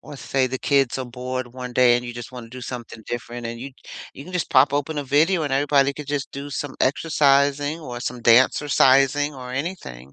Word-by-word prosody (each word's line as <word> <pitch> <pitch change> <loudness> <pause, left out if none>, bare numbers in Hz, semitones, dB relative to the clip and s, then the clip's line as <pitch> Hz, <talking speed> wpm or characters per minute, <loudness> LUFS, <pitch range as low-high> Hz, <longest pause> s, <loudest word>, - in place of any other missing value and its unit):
or 145 - -11
say 130 -1 -1
the 130 0 -4
kids 135 -3 +1
are 130 - -3
bored 125 +1 -5
one 125 -1 -7
day 120 -1 +5
and 120 - -4
you 120 - -6
just 120 +1 -9
wanna 120 -2 -9
do 130 +1 -10
something 120 -2 -8
different 120 0 -5
and 115 0 -6
you 135 +2 -7 0.4
you 140 - -11
can 185 - -11
just 180 - -2
pop 135 +2 +5
open 145 +1 -1
a 145 - -3
video 155 +6 +2
and 145 - -3
everybody 140 0 +2
could 145 0 -9
just 145 -2 -3
do 140 +1 -7
some 145 0 -4
exercising 145 +1 +2
or 125 -7 -7
some 125 0 -4
dancercising 135 +3 +4
or 125 -1 -8
anything. 130 - -6
135 Hz, 215 wpm, -22 LUFS, 125-145 Hz, 0.4 s, day